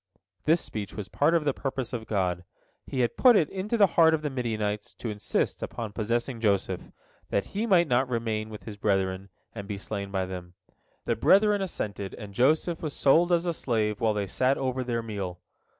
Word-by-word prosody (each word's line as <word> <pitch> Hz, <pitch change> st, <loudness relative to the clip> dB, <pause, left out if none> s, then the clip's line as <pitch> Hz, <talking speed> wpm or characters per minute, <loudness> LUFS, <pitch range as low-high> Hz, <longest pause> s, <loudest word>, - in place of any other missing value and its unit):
This 160 Hz, +2 st, +4 dB
speech 105 Hz, -3 st, -6 dB
was 105 Hz, -3 st, -5 dB
part 155 Hz, +4 st, +2 dB
of 160 Hz, -3 st, +1 dB
the 145 Hz, -, +2 dB
purpose 135 Hz, -2 st, -4 dB
of 115 Hz, -2 st, -4 dB
God. 90 Hz, -4 st, 0 dB, 0.4 s
He 130 Hz, -, -1 dB
had 120 Hz, -, 0 dB
put 250 Hz, -3 st, +7 dB
it 160 Hz, -7 st, +3 dB
into 200 Hz, +5 st, -2 dB
the 205 Hz, -, +7 dB
heart 165 Hz, -3 st, +5 dB
of 155 Hz, -, -6 dB
the 150 Hz, -, -1 dB
Midianites 110 Hz, -5 st, -2 dB
to 115 Hz, -, -4 dB
insist 105 Hz, -1 st, -1 dB
upon 110 Hz, -3 st, -5 dB
possessing 115 Hz, +3 st, -1 dB
Joseph, 100 Hz, -4 st, +1 dB, 0.5 s
that 100 Hz, -, 0 dB
he 215 Hz, +4 st, -1 dB
might 175 Hz, -5 st, +5 dB
not 130 Hz, 0 st, +2 dB
remain 110 Hz, -3 st, -2 dB
with 105 Hz, -3 st, -9 dB
his 105 Hz, +1 st, -8 dB
brethren, 95 Hz, -1 st, 0 dB, 0.2 s
and 100 Hz, -3 st, -7 dB
be 100 Hz, -1 st, -4 dB
slain 100 Hz, 0 st, -5 dB
by 95 Hz, -1 st, -1 dB
them. 90 Hz, -1 st, -8 dB, 0.5 s
The -, -, +1 dB
brethren 205 Hz, 0 st, +4 dB
assented, 100 Hz, -, -4 dB
and 105 Hz, -3 st, -9 dB
Joseph 155 Hz, -, +2 dB
was 155 Hz, -3 st, -3 dB
sold 165 Hz, +6 st, +4 dB
as 170 Hz, 0 st, +3 dB
a 170 Hz, -, 0 dB
slave 110 Hz, -7 st, -1 dB
while 110 Hz, -2 st, +2 dB
they 100 Hz, -1 st, 0 dB
sat 130 Hz, +7 st, +1 dB
over 130 Hz, -1 st, -1 dB
their 120 Hz, -2 st, -2 dB
meal. 100 Hz, -5 st, -5 dB
115 Hz, 200 wpm, -27 LUFS, 100-150 Hz, 0.5 s, put